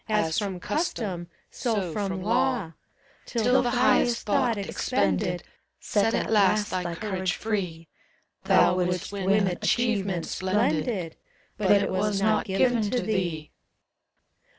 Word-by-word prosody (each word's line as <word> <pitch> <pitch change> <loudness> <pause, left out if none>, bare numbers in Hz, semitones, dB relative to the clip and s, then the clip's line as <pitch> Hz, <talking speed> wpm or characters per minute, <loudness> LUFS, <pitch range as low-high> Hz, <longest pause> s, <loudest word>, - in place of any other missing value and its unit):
183 210 -6 +1
As 160 - 0
from 195 -4 -3
custom, 200 - -3 0.2
so 205 -9 -2
from 190 -3 -3
law; 240 -4 +1 0.6
Till 245 +2 +2
the 245 - 0
highest 240 -1 +2
thought 230 +1 +1
expended 175 - -1 0.4
Set 220 +2 +1
At - - -1
last 210 0 +3
thy 175 -2 -2
courage 190 -2 -2
free: 180 -7 -3 0.6
Thou 180 - +4
wouldst 180 0 -1
win 200 +1 +2
achievement 195 -2 0
splendid, 185 -2 -1 0.4
But 200 -2 -1
it 200 -1 +4
was 200 +1 0
not 215 +1 +2
given 235 +5 +2
to 250 - 0
thee. 175 -9 -2
200 Hz, 125 wpm, -26 LUFS, 180-220 Hz, 0.6 s, Thou